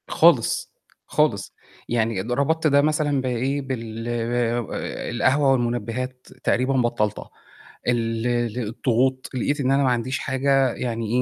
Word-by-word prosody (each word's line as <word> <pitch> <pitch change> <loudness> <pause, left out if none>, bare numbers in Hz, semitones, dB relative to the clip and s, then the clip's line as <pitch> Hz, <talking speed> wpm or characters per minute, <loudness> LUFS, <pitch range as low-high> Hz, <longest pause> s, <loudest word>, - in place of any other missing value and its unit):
خالص، - - +3 0.3
خالص - - +1 0.4
يعني 115 -4 0
ده 120 +3 -2
رَبطت 160 +4 +1
ده 140 -1 +5
مثلًا 150 -2 +1
بإيه، 130 +3 -1
بال 115 -4 -5
ال 120 0 -2
القهوة 135 +4 +3
والمُنبهات 125 +1 -2 0.2
تقريبًا 130 +2 +2
بطّلتها، 120 -5 0 0.6
ال 115 -1 0 0.3
الضغوط 125 +3 0
لقيت 145 +3 -1
إن 135 -1 +1
أنا 140 +1 +3
ما 130 - +3
عنديش 125 +2 -1
حاجة 135 -1 +2
يعني 115 -2 -3
125 Hz, 125 wpm, -23 LUFS, 115-135 Hz, 0.6 s, ده